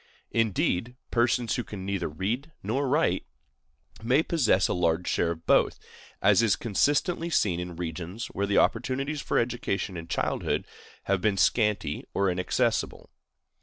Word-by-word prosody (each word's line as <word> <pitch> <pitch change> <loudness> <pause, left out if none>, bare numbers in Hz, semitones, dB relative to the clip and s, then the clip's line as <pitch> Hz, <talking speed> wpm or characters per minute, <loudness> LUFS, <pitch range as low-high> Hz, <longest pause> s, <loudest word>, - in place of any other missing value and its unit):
Indeed, 115 0 0 0.2
persons 120 -1 +2
who 125 - -1
can 100 -4 -8
neither 100 -4 -2
read 110 - -3
nor 130 +7 -1
write 135 - +1 0.7
may 125 +7 +3
possess 110 - +2
a - - -1
large 90 0 0
share 85 - +1
of 80 0 -16
both, - - +3 0.5
as 100 +1 +5
is 115 -5 +3
constantly 145 - +1
seen 95 - +1
in 90 -1 -5
regions 85 +5 -5
where 100 +1 -1
the 100 - +1
opportunities 135 +5 +1
for - - -1
education 115 -5 -1
in 85 0 -7
childhood - - -1 0.4
have 100 -1 0
been 105 -2 +1
scanty 105 -8 +1
or 100 -1 +2
inaccessible. 90 +1 -1
100 Hz, 145 wpm, -27 LUFS, 90-125 Hz, 0.7 s, as